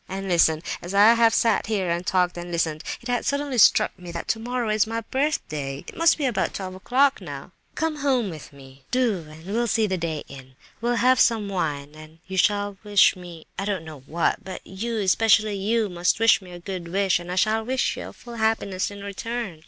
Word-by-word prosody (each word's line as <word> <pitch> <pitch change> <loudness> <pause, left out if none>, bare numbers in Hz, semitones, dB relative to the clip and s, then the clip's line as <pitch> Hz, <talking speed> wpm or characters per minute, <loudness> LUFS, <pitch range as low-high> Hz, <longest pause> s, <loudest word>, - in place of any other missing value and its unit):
And 195 +1 -5
listen: 165 -3 +3 0.2
as 180 +3 -6
I 210 +3 +7
have 230 -1 +4
sat 225 -2 +2
here, 195 -5 0
and 170 +1 -1
talked, 180 -1 +1
and 175 0 -7
listened, 160 -2 -1 0.2
it 235 - -9
has 245 -1 -1
suddenly 280 -3 -1
struck 190 - +5
me 175 -1 -8
that 170 - -5
tomorrow 235 +1 -2
is 215 0 +2
my 225 +1 -3
birthday. 155 - -2
It - - -9
must 330 0 +4
be 295 - -1
about 245 -5 -1
twelve 185 -1 -5
o'clock, 260 +9 +2
now; - - -8 0.2
come 320 -1 -1
home 260 -8 +1
with 155 -3 -10
me—do, 145 - -3
and 160 +2 -13
we'll 230 +5 -1
see 225 0 +2
the 190 -3 -1
day 160 -3 -3
in! 130 -1 -12 0.3
We'll 240 +1 +1
have 255 +2 +4
some 220 -4 +3
wine, 145 -6 -3
and 155 +1 -13
you 190 0 -6
shall 205 +1 +1
wish 205 -2 +5
me—I 175 +1 -9
don't 195 -5 -2
know 155 -2 -9
what—but 170 +3 -2
you, 225 +5 -4
especially 215 +1 +3
you, 215 +3 +1
must 180 +2 0
wish 225 -2 +5
me 185 - -13
a 175 - -9
good 180 -1 -6
wish, 190 +1 +1
and 175 0 -8
I - - -2
shall 215 +4 +2
wish 255 +3 0
you - - -7
full 235 -1 -11
happiness 220 -4 0
in 200 -1 -9
return. 200 -2 -5
200 Hz, 205 wpm, -24 LUFS, 175-230 Hz, 0.3 s, I